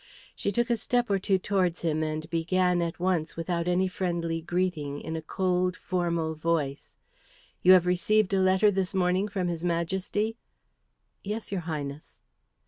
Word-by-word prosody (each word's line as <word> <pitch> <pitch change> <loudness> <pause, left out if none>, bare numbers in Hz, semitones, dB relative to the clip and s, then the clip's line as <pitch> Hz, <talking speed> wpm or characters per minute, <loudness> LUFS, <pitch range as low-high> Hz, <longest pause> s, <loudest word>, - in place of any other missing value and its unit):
She 200 - -1
took 240 +2 0
a 235 - +2
step 240 0 0
or 195 - +2
two 190 0 +2
towards 185 -3 0
him 155 -2 0
and 155 0 -3
began 180 +2 +2
at 170 0 -3
once 175 -3 0
without 170 0 -2
any 180 +1 +2
friendly 170 -3 -2
greeting 165 -5 -2
in 160 +1 -5
a 160 - -3
cold, 180 +2 0
formal 170 -3 -1
voice, 155 -3 -2 0.7
"You 185 - +8
have 180 -2 +6
received 195 +3 +2
a 195 - +3
letter 190 +2 +4
this 190 -1 -1
morning 185 +2 +2
from 195 -3 -2
his 170 -1 -3
Majesty?" 190 +6 -1 0.9
"Yes, 210 +2 -4
your 195 -3 -1
Highness." 150 -3 -6
180 Hz, 160 wpm, -28 LUFS, 165-190 Hz, 0.9 s, You